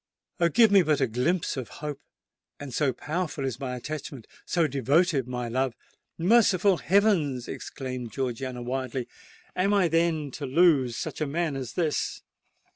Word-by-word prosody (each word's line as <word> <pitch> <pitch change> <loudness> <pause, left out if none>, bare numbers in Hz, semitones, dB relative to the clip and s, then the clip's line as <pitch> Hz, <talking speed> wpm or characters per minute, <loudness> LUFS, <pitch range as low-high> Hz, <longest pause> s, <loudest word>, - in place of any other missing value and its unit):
Oh! 170 -1 +4
give 225 +4 +5
me 200 -1 +7
but 155 -4 +1
a 135 - +3
glimpse 130 +10 0
of 130 - -5 0.2
hope, 145 -2 -5 0.6
and 140 -3 -7
so 140 +1 +2
powerful 150 +2 -3
is 130 -2 -3
my 130 -2 -3
attachment—so 145 +4 -4
devoted 140 +1 +2
my 125 -1 -3
love——" 130 +1 -1 0.4
"Merciful 195 -1 +4
heavens!" 170 - +2
exclaimed 130 -4 -6
Georgiana 130 -1 -3
wildly,—"am 185 - -3
I 190 -3 +4
then 160 -3 +1
to 140 +2 -5
lose 135 -5 +3
such - - -5
a 155 - +1
man 160 0 -1
as 130 -3 -5
this?" 160 -4 -1
145 Hz, 145 wpm, -27 LUFS, 130-175 Hz, 0.6 s, me